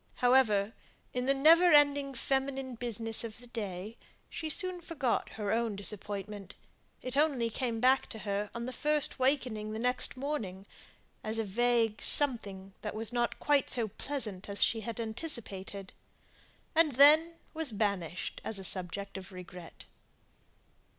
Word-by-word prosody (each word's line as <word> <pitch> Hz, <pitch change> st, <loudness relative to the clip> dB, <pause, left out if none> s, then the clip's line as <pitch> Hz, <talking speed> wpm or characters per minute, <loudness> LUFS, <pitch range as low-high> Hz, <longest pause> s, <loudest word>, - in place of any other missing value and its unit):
However, 230 Hz, -5 st, +3 dB, 0.4 s
in 250 Hz, +1 st, -2 dB
the 275 Hz, -, +4 dB
never 330 Hz, +5 st, +6 dB
ending 285 Hz, -2 st, +4 dB
feminine 265 Hz, +1 st, -2 dB
business 225 Hz, -1 st, 0 dB
of 225 Hz, -2 st, -7 dB
the 245 Hz, -, -11 dB
day, 210 Hz, -2 st, -6 dB, 0.3 s
she 315 Hz, -, -5 dB
soon 370 Hz, +1 st, -1 dB
forgot 310 Hz, -8 st, -2 dB
her 205 Hz, -2 st, -2 dB
own 225 Hz, -1 st, 0 dB
disappointment; 200 Hz, 0 st, -4 dB, 0.5 s
it 255 Hz, 0 st, -4 dB
only 275 Hz, -6 st, +1 dB
came 235 Hz, -2 st, -2 dB
back 260 Hz, +3 st, +3 dB
to -, -, -7 dB
her 205 Hz, -1 st, -3 dB
on 235 Hz, +1 st, -4 dB
first 300 Hz, +3 st, 0 dB
wakening 250 Hz, -6 st, 0 dB
the -, -, -4 dB
next 250 Hz, +2 st, 0 dB
morning, 225 Hz, -10 st, -4 dB, 0.6 s
as 220 Hz, +1 st, -1 dB
a 225 Hz, -, 0 dB
vague 225 Hz, +1 st, +1 dB
something 200 Hz, -9 st, +3 dB
that 210 Hz, -1 st, -5 dB
was 225 Hz, +1 st, -3 dB
not 240 Hz, -1 st, 0 dB
quite 290 Hz, -2 st, +1 dB
so 230 Hz, -4 st, +2 dB
pleasant 210 Hz, -6 st, -4 dB
as 200 Hz, -, +1 dB
she 225 Hz, -, +1 dB
had 230 Hz, +2 st, -6 dB
anticipated, 220 Hz, -, -1 dB, 0.8 s
and 315 Hz, -3 st, +3 dB
then 305 Hz, +6 st, +6 dB, 0.2 s
was 320 Hz, -5 st, -3 dB
banished 200 Hz, -5 st, -2 dB
as 220 Hz, -, -3 dB
a 195 Hz, -, -7 dB
subject 185 Hz, +2 st, -4 dB
of 185 Hz, -, -12 dB
regret. 180 Hz, -2 st, -11 dB
230 Hz, 145 wpm, -31 LUFS, 205-270 Hz, 0.8 s, never